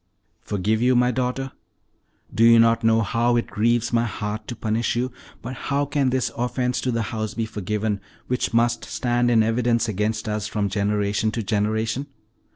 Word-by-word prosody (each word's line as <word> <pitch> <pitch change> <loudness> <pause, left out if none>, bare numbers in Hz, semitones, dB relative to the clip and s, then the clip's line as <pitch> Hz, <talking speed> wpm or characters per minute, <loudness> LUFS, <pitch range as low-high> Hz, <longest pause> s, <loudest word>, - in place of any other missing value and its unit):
"Forgive 105 +3 -1
you, 125 +1 +4
my 125 0 +3
daughter? 130 +2 -2 0.8
Do 115 - +2
you 115 0 +8
not 115 0 +4
know 115 0 +4
how 120 +2 +1
it 120 - +1
grieves 120 +3 0
my 115 0 +3
heart 105 -1 -4
to 120 - -5
punish 110 +1 -1
you; 125 +2 -1 0.3
but 125 +2 -5 0.2
how 140 0 +1
can 140 -2 +1
this 130 0 0
offense 125 +1 -1
to 125 - -1
the 115 -1 0
house 110 -1 -3
be 115 - -1
forgiven, 105 0 -2 0.2
which 125 0 -1
must 120 0 +2
stand 120 -1 0
in 115 -2 +4
evidence 115 +1 +1
against 110 +1 -1
us 105 -1 -2
from 105 -2 -1
generation 105 +1 0
to 115 - -2
generation? 110 +5 -1
115 Hz, 175 wpm, -23 LUFS, 110-120 Hz, 0.8 s, you